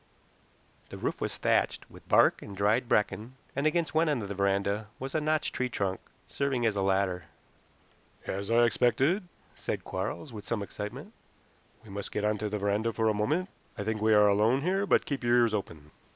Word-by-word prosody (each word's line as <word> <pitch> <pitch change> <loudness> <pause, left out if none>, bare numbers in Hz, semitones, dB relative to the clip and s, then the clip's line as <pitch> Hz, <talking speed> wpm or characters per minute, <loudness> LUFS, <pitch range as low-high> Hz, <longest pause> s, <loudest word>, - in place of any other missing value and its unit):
The - - -8
roof - - -3
was - - -2
thatched - - +1
with - - -16
bark - - +5
and 100 -2 -9
dried 110 +5 +2
bracken, 110 +4 0 0.2
and 140 +2 +2
against 165 0 0
one 160 0 +3
end 135 -7 0
of 100 - -6
the - - -2
veranda 100 +2 0
was 135 +1 -6
a 155 - +1
notched 155 +1 0
tree 125 -1 -1
trunk, 95 -5 -2 0.3
serving 135 -4 -1
as 110 -2 +2
a 100 - 0
ladder. 95 -3 +1 1.0
"As 100 +2 -4
I 120 +1 +5
expected," 135 - +2 0.3
said - - -4
Quarles, 105 +8 -4
with 105 -2 -8
some 115 -3 -1
excitement. 120 - -7 0.7
"We 110 - -13
must 100 0 -5
get 105 - -1
onto 105 0 0
the 105 - -2
veranda 105 +3 0
for 110 0 +1
a - - +2
moment. 150 - 0 0.3
I 105 - -3
think 110 0 -2
we 110 0 +4
are 105 0 +6
alone 110 +7 +3
here, 195 +3 +1
but - - +3
keep 140 -3 -3
your 120 0 +4
ears 120 -2 +3
open." 80 -7 -5
110 Hz, 195 wpm, -29 LUFS, 100-135 Hz, 1.0 s, are